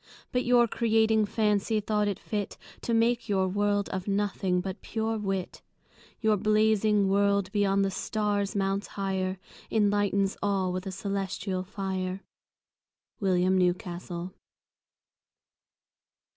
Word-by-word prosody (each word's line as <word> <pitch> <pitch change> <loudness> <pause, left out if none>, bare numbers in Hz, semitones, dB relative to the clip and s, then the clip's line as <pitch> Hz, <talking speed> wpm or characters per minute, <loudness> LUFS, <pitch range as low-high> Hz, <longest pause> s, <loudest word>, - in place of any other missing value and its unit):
But 250 0 +1
your 240 -1 +5
Creating 220 -1 +2
Fancy, 210 0 +1
thought 210 0 0
it 200 - -1
fit 205 -3 -4 0.2
To - - -3
make 235 0 +2
your 190 -2 +2
World 205 +1 +1
of 190 0 -4
Nothing, 195 -2 0
but 190 0 -5
pure 225 0 -2
Wit. 195 -3 -3 0.6
Your 220 -2 +3
Blazing 215 -1 +3
World, 200 0 +2
beyond 200 -1 +2
the 195 - -1
Stars 205 0 -1
mounts 195 0 0
higher, 190 -1 -1 0.3
Enlightens 205 -2 +1
all 195 -3 0
with 185 +1 -4
a - - -2
Cœlestial 195 -1 -3
Fier. 190 -1 -3 1.0
William 185 -2 +2
Newcastle. 180 0 -1
200 Hz, 115 wpm, -28 LUFS, 190-210 Hz, 1.0 s, your